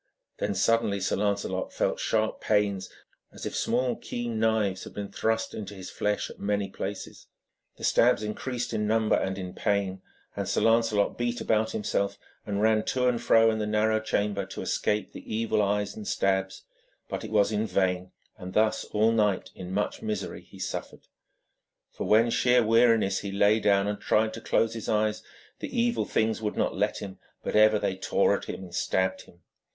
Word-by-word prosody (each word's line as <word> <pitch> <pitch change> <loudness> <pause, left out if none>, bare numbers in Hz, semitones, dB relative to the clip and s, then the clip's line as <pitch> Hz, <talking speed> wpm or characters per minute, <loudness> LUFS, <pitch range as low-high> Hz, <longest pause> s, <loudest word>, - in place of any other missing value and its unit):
Then 100 -1 -1
suddenly 110 0 +2
Sir 95 - 0
Lancelot 100 -2 -1
felt - - -1
sharp 110 -1 0
pains, 100 -3 +1 0.4
as - - -9
if - - -4
small 125 +1 +1
keen 120 -2 -4
knives 110 -4 +1
had - - -11
been 100 -1 -5
thrust 115 +2 -1
into 105 -1 -6
his 95 -1 -8
flesh 105 0 -1
at - - -14
many 100 -1 -1
places. 95 +1 -6 0.5
The - - -12
stabs - - +4
increased 120 +3 -3
in 105 0 0
number 110 0 +3
and 95 0 -1
in 90 -1 -6
pain, 100 -3 -1 0.3
and - - -3
Sir - - +1
Lancelot 115 -2 +2
beat 120 0 -1
about 110 0 +1
himself 100 -1 -1 0.3
and 100 0 -1
ran 110 -1 +3
to 125 -1 +1
and 120 -2 +1
fro 115 -2 +5
in 110 - -2
the 105 - -1
narrow 110 +1 +2
chamber 105 -2 -1
to 95 - -6
escape 105 0 -1
the - - -10
evil 110 -1 +1
eyes 105 0 0
and 105 - -8
the - - -1
stabs, 95 0 0 0.4
but - - -4
it - - -6
was 105 -1 +3
in 110 +1 0
vain, 90 -1 0 0.3
and 90 0 -7
thus 110 0 +2
all 110 +2 +2
night 105 -4 +1
in 90 0 -8
much 105 +2 -2
misery 105 -3 -4
he - - -16
suffered. - - -5 0.9
When 110 +2 +4
for 120 - -2
sheer 125 0 +4
weariness 115 -3 +4
he 100 - -5
lay 100 +2 +3
down 100 -2 +3
and 105 0 -3
tried 110 0 +2
to 115 - -7
close 115 0 +1
his 115 -2 -6
eyes, 105 0 +1 0.4
the - - -5
evil 235 0 +1
things 110 0 0
would 105 -1 -3
not - - 0
let 105 +2 -1
him, 95 -2 -8 0.2
but - - -3
ever 110 0 +6
they 95 - -1
tore 95 - +2
at - - -6
him - - -6
and 90 -2 -11
stabbed 95 0 0
him. 85 -1 -21
105 Hz, 190 wpm, -27 LUFS, 100-110 Hz, 0.9 s, ever